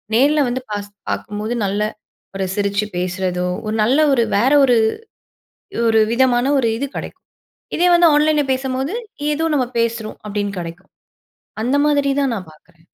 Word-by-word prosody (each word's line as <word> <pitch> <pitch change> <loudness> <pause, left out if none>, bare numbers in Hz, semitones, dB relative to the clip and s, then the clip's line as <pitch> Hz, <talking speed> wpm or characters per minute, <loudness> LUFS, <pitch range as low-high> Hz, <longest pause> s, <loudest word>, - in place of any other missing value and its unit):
நேர்ல 290 +5 +4
வந்து 255 +1 -2
பாஸ் 205 0 -4 0.2
பார்க்கும்போது 210 +3 -4
நல்ல 200 +2 -1 0.5
ஒரு 190 -1 -1
சிரிச்சு 200 0 0
பேசுறதோ, 180 0 -2 0.2
ஒரு 215 +1 -2
நல்ல 260 +7 +3
ஒரு 235 -3 +3
வேற 250 +6 +3
ஒரு 245 -2 +3 1.1
ஒரு 225 -1 +4
விதமான 245 0 +3
ஒரு 235 -3 +2
இது 280 - -2
கெடைக்கும். - - -8 0.5
இதே 355 +1 +3
வந்து 345 -1 +6
ஆன்லைன்ல 300 0 +3
பேசம்போது 265 +6 -2 0.4
ஏதோ 320 +2 -1
நம்ம 255 -4 +1
பேசுறோம் 230 -1 -2
அப்படீன்னு 205 -1 -3
கெடைக்கும். 175 +3 -8 0.7
அந்த 255 +4 +1
மாதிரி 285 -2 +2
தான் 270 -4 +1
நான் 185 -6 -7
பார்க்குறேன். 165 +1 -24
230 Hz, 150 wpm, -19 LUFS, 200-270 Hz, 1.1 s, வந்து